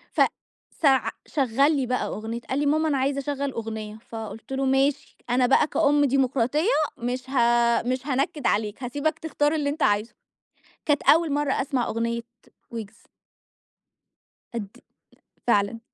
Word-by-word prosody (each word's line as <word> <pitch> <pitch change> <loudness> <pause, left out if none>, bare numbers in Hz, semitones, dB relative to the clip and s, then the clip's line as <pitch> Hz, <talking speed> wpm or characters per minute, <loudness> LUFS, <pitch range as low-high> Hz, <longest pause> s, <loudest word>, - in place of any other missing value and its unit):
ف - - +3 0.6
سع 270 -4 +4 0.2
شغّل 275 +2 +2
لي 270 - 0
بقى 250 +1 -1
أغنية. 225 +2 -5
قال 265 - 0
لي: 290 - 0
"ماما 310 +2 +2
أنا 280 - +1
عايز 275 +1 0
أشّغل 280 0 -2
أغنية." 220 -2 -5
فقُلت 225 +2 -7
له: 270 0 0
"ماشي، 270 +2 +1
أنا 250 +1 +3
بقى 270 +4 +4
كأُم 290 -2 +3
ديموقراطية 270 - +1 0.3
مش 250 +2 -4
ه - - -7 0.5
مش 255 +3 -2
هانكّد 280 +1 0
عليك، 210 +4 -1
هاسيبك 290 +6 -1
تختار 300 -1 0
اللي 295 -2 0
أنت 295 +2 -2
عايزه." 205 +3 +1 0.7
كانت 295 -1 +2
أول 325 -1 +4
مرّة 290 -1 +1
أسمع 260 -3 -1
أغنية 235 +1 -2 0.5
ويجز. 225 -2 -8 1.5
أد 205 -3 -6 0.7
فعلًا. 205 -1 +2
265 Hz, 145 wpm, -25 LUFS, 230-290 Hz, 1.5 s, سع